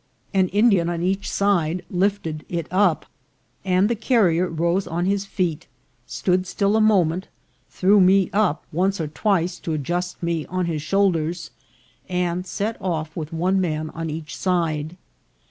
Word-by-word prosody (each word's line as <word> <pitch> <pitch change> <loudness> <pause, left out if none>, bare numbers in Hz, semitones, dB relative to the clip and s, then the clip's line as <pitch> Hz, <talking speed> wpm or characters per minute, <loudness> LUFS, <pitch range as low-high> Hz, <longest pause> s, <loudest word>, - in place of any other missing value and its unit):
An 190 -1 +3
Indian 200 -3 +3
on 170 0 -2
each 190 +2 -1
side 180 -3 +1
lifted 180 -5 -1
it 170 -2 -2
up, 185 -3 +2 0.6
and 185 +1 +3
the 235 - +1
carrier 205 -7 +2
rose 170 +3 0
on 175 +2 -2
his 200 +1 0
feet, 175 -6 -2 0.4
stood 185 0 0
still 200 +3 +1
a 220 - +3
moment, 185 -4 +2 0.4
threw 195 +2 +4
me 190 0 +5
up 195 -7 +1
once 190 +4 0
or 160 - -2
twice 180 +1 0
to 165 - -3
adjust 175 +5 -3
me 170 -2 -1
on 185 0 -1
his 160 -3 -2
shoulders, 175 -1 0 0.6
and 180 0 -1
set 215 +4 -3
off 160 -4 -3
with 155 -1 -5
one 185 +4 +1
man 155 -3 -2
on 165 0 -5
each 155 -1 -6
side. 165 -3 -1
180 Hz, 155 wpm, -22 LUFS, 165-195 Hz, 0.6 s, me